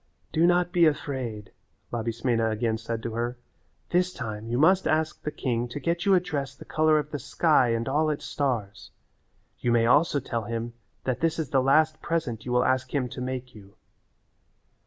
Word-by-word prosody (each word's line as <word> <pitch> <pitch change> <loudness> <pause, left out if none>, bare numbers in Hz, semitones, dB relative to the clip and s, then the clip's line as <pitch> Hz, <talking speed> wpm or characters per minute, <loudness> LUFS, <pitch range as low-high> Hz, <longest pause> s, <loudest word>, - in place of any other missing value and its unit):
"Do 165 +2 +3
not 175 0 +2
be 170 -2 +5
afraid," 130 -8 -3 0.4
Labismena 115 0 0
again 110 0 -1
said 115 0 -4
to 115 - -4
her. 120 +2 -2 0.5
"This 180 +1 +2
time 110 -7 -6
you 120 - 0
must 185 +7 +4
ask 155 0 0
the - - -3
king 120 -5 -2
to 125 +4 -6
get 170 +5 -1
you 195 - +6
a - - +5
dress 145 -6 -4
the - - -12
colour 155 0 +3
of 150 0 -2
the 145 - -3
sky 140 -1 +3
and 115 0 -1
all 155 +3 +2
its 150 - -3
stars. 115 -8 -2 0.7
You 120 - 0
may 115 -1 +4
also 145 +4 +4
tell 115 -3 -3
him 115 +1 -4 0.3
that 130 -2 -1
this 165 0 +1
is 155 -5 -3
the 135 - +4
last 155 +4 +3
present 130 -9 -2
you - - -2
will 125 0 +3
ask 130 -1 +1
him 130 -3 0
to 125 - -7
make 130 0 -4
you." 100 -1 -15
130 Hz, 195 wpm, -26 LUFS, 115-155 Hz, 0.7 s, you